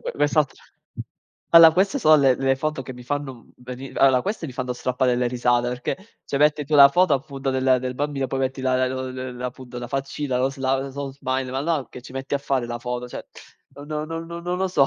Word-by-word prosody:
quest'altra - - 0 0.9
allora 165 -1 +10
queste 195 - +1
sono 155 -9 +6
le 135 -3 +4
le 135 0 +2
foto 150 0 -3
che 130 - -8
mi 125 0 -11
fanno, 145 +1 -3
uhm, 120 - -17
veni 125 +2 -8
allora, 130 -2 +4
queste 200 -5 -3
mi 130 - -8
fanno 125 0 -3
strappare 125 0 0
delle 125 0 +1
risate, 120 0 +1
perché 125 0 -3 0.3
se 140 - -4
metti 150 0 +3
tu 150 +2 -2
la 140 -1 +10
foto 175 +2 +3
appunto 135 0 -3
del 130 -1 +2
del 130 0 -4
bambino 140 0 -2
poi 135 - -2
metti 130 0 -2
la 130 0 +1
la 130 0 -4
la 130 0 -6
la 125 +1 -5
appunto 125 -1 -8
la 120 - -6
faccina, 135 0 -2
lo 130 +1 +2
sla 135 -1 0
ls 135 0 -6
lo 140 -1 -4
smile, 130 -1 -3
ma 130 +1 -2
no, 150 -2 -1
che 125 - -11
ci 130 - -12
metti 135 +1 -4
a - - +1
fare 135 -3 -1
la 120 0 -4
foto? 125 0 -4
Cioè, - - -8 0.5
non 145 +1 -11 0.2
non 165 +1 -5
non 170 0 -7
non 180 +1 -2
lo 190 0 0
so. 140 -7 +3
135 Hz, 240 wpm, -23 LUFS, 125-145 Hz, 0.9 s, allora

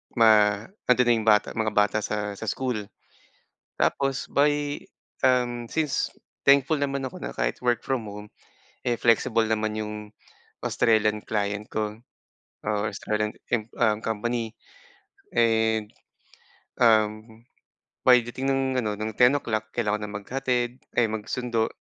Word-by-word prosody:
ma 105 -3 +5 0.2
andon 125 0 +5
na 120 - +6
'yong 110 - -6
bata, 105 -1 +4
mga 110 -1 -1
bata 105 0 +3
sa 105 -1 -2
sa 110 - -7
school. 110 -3 -2 0.9
Tapos, 135 -1 0
by, 145 0 +1 0.4
um, 120 -2 +1
since 155 -4 0 0.4
thankful 140 +2 +5
naman 135 -1 -1
ako 130 - -7
na - - -4
kahit - - -2
work 120 -1 0
from 130 -5 -1
home, 105 +1 -9 0.6
eh, 120 -1 +1
flexible 115 0 +3
naman 110 0 -1
'yung 105 0 -4 0.7
Australian 105 -2 +2
client 105 -1 -2
ko 105 0 -2 0.7
or 105 0 -1
Australian, 105 +1 -2 0.2
im 110 -3 0
um, 110 -2 +3
company. 115 +1 -2 0.8
And, 110 -2 +2 0.9
um, 110 -1 +2 0.6
pagdating 125 +1 +4
ng 135 0 +1 0.2
ano, 105 -1 -1
ng 110 0 -2
10:00, 120 -4 +2
kailangan 105 -2 -1
ng 100 - -9
maghatid, 125 0 -1 0.2
ay 120 -2 +4
magsundo. 110 +1 -1
110 Hz, 125 wpm, -26 LUFS, 105-125 Hz, 0.9 s, na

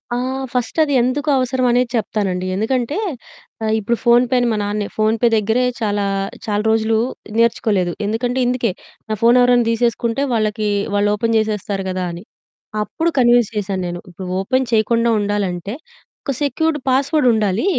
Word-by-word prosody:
ఆ! - - 0 0.4
ఫస్ట్ 250 +1 -2
అది 290 -2 -1
ఎందుకు 280 +5 0
అవసరం 255 0 0
అనేది 245 0 +2
చెప్తానండి. 195 -5 -1
ఎందుకంటే, 245 - -1 0.7
ఆ - - 0
ఇప్పుడు 235 +3 -1
ఫోన్‌ 240 +1 +5
పేని 245 -1 +3
మా 220 - 0
నాన్నే 205 0 -2
ఫోన్‌పే 220 +2 +2
దగ్గరే 220 +4 +1 0.2
చాలా 205 -2 0 0.4
చాలా 210 -1 -1
రోజులు 220 0 +2 0.4
నేర్చుకోలేదు. 215 -6 +1
ఎందుకంటే 240 +4 -1
ఇందుకే, 245 -3 0 0.4
"నా 215 - 0
ఫోను 235 +2 +5
ఎవరైనా 245 -1 +4
తీసేసుకుంటే 235 +2 0
వాళ్ళకి 215 -1 0 0.3
వాళ్ళు 205 0 +2
ఓపెన్ 230 +2 0
చేసేస్తారు 205 -2 -2
గదా!" 185 0 -2
అని. 170 +2 -8 0.6
అప్పుడు 325 +9 -1
కన్విన్స్ 240 -2 +4
చేశాను 195 -2 -2
నేను. 175 0 -5
ఇప్పుడు 180 +1 -8
ఓపెన్ 260 +7 +1
చేయకుండా 230 +1 +2
ఉండాలంటే 200 -1 -2 0.5
ఒక 275 - -2
సెక్యూర్డ్ 320 +2 0
పాస్వర్డ్ 275 +2 +2
ఉండాలి. 210 - 0
225 Hz, 150 wpm, -19 LUFS, 205-245 Hz, 0.7 s, ఫోన్‌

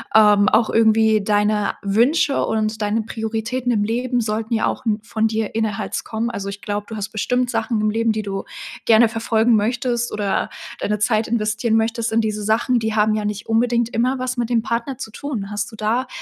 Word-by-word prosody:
ähm, 210 -1 +6
auch 220 0 +3
irgendwie 220 -1 +4
deine 210 0 +1
Wünsche 245 +9 +2
und 215 0 -1
deine 210 +2 0
Prioritäten 225 +3 -3
im 210 -3 +1
Leben 245 +3 -1
sollten 220 0 -2
ja 220 - +1
auch - - -2
n 215 -2 0
von 220 0 0
dir 220 -1 -2
innerherz 220 -2 -2
kommen. 230 +2 -2
Also, 200 -2 -4
ich 200 0 -7
glaube, 205 0 -4
du 225 - -6
hast 210 0 -4
bestimmt 250 +3 -1
Sachen 230 -3 -1
im 215 - +1
Leben, 225 +1 +1
die 215 0 -3
du 195 -1 -4 0.4
gerne 225 0 +5
verfolgen 225 +1 +2
möchtest 235 +2 0
oder 205 -2 -1 0.3
deine 210 +1 -1
Zeit 215 +1 +1
investieren 220 0 0
möchtest 225 +1 0
in 225 - +2
diese 215 -1 -2
Sachen, 230 +4 +1
die 220 -1 -2
haben 215 0 +3
ja 215 -1 -1
nicht 210 +1 -4
unbedingt 235 +1 +1
immer 250 +3 0
was 255 0 -3
mit 235 -1 -1
dem 235 -2 +2
Partner 235 +2 -3
zu 225 -4 -7
tun. 220 -7 -5
Hast 205 0 -3
du 220 - -12
da 225 +5 -1
220 Hz, 205 wpm, -21 LUFS, 215-235 Hz, 0.4 s, ähm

